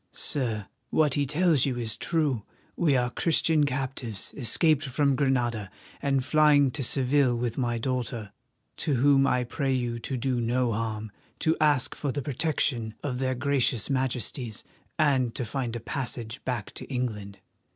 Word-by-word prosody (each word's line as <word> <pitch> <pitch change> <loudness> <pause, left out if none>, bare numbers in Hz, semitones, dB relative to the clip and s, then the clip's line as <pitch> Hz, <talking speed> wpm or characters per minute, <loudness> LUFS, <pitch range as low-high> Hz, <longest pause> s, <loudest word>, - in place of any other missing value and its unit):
Sir, 115 -8 -1 0.2
what 150 -3 +3
he 145 0 +1
tells 155 -1 +3
you 130 -2 -1
is 115 -3 -3
true. 150 -9 0 0.3
We 150 -6 +3
are 125 -1 0
Christian 160 -2 +2
captives 130 -6 -4
escaped 145 +4 +3
from 140 0 +1
Granada 120 -7 0 0.3
and 135 -2 +1
flying 145 -2 +5
to 140 - -3
Seville 130 0 +2
with 120 -1 -2
my 120 -3 0
daughter, 120 -3 -3 0.5
to 150 - 0
whom 135 +2 +4
I 125 -2 +2
pray 135 +3 -2
you 120 -2 -1
to 130 +3 -4
do 125 0 0
no 120 +1 +1
harm, 110 -1 -3 0.3
to 160 0 +3
ask 145 -4 +3
for 145 - -2
the 145 +1 -3
protection 130 -6 0
of 130 -4 -2
their 130 -1 0
gracious 130 -3 +1
Majesties, 125 -3 -1 0.3
and 135 -7 +2
to 125 - -2
find 120 0 -3
a - - -3
passage 120 -1 -5
back 120 -5 -3
to - - -8
England." 110 -7 -4
130 Hz, 160 wpm, -27 LUFS, 120-140 Hz, 0.5 s, flying